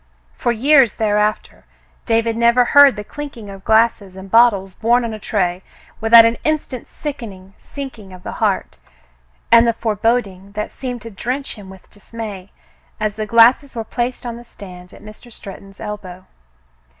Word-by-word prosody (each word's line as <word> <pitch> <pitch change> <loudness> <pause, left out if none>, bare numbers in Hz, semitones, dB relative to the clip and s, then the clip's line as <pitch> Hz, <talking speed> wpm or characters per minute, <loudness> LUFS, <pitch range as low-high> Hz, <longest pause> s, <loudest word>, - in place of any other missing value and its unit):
For 240 - -1
years 260 0 +4
thereafter, 210 -1 -1 0.4
David 230 -1 +1
never 235 +1 +3
heard 285 -1 +6
the 210 - -6
clinking 275 -5 -9
of 195 -1 -12
glasses 220 -3 +2
and 190 0 -11
bottles 210 -5 +4
borne 235 +4 +1
on 225 - -4
a 215 - -7
tray 185 -4 -1 0.4
without 225 +1 +7
an 230 0 0
instant's 305 -5 -3
sickening 205 -10 -8
sinking 255 -9 -9
of 180 -1 -13
the - - -6
heart, - - -1 0.7
and 235 0 +7
the 230 - +2
foreboding 210 -3 -2
that 210 0 -4
seemed 245 -4 -6
to 230 - -9
drench 255 +8 -4
him 200 -4 -12
with 190 -1 -15
dismay 205 -2 -9 0.5
as 215 -1 -2
the 215 0 -4
glasses 240 +5 +4
were 225 - -3
placed 245 +3 -4
on 235 -1 -5
the 240 - -11
stand 180 -6 -13
at - - -16
Mr. 215 +3 -13
Stretton's 195 -2 -12
elbow. 195 -4 -8
225 Hz, 160 wpm, -18 LUFS, 200-240 Hz, 0.7 s, without